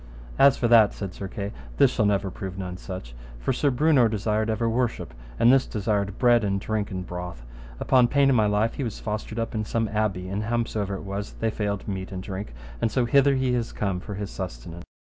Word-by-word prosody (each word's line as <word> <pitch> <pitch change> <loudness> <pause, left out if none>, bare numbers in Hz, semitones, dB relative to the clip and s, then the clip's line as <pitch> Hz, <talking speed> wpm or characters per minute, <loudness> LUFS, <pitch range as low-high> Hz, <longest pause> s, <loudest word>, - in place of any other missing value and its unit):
As 140 -1 +6
for 120 - +1
that, 115 -3 +6
said 95 -3 -5
Sir 100 - -6
Kay, 100 +1 -5 0.3
this - - +5
shall 110 - +1
never 100 -2 0
prove 95 0 -6
none 90 -2 -5
such. 90 -10 -8 0.2
For - - -1
Sir 145 - +2
Brewnor 135 -2 +4
desired 110 +1 0
ever 110 +1 0
worship, 115 +1 -1 0.2
and 120 +2 +6
this 135 -1 +3
desireth 100 -2 -1
bread 120 -2 +4
and 100 -1 0
drink 105 0 -2
and 95 -2 -5
broth; 90 -9 -7 0.3
upon 125 -2 +4
pain 140 +2 +3
of 135 - +4
my 110 -2 +4
life 105 +2 +1
he 140 - -4
was 115 -4 -4
fostered 110 +1 -4
up 115 0 -2
in 110 -1 -1
some 110 +1 -1
abbey, 105 -4 -1
and, 100 +2 -2
howsomever 110 -4 -1
it - - -7
was, 100 +1 -5
they 115 0 -1
failed 100 -2 -3
meat 95 -2 -4
and 95 -1 -5
drink, 95 - -6 0.3
and - - +2
so 125 +2 +1
hither 140 +3 +4
he 130 -1 +1
is 120 -2 -1
come 100 -3 -2
for 100 +2 -7
his 100 0 -5
sustenance. 85 -1 -7
105 Hz, 220 wpm, -25 LUFS, 95-115 Hz, 0.3 s, As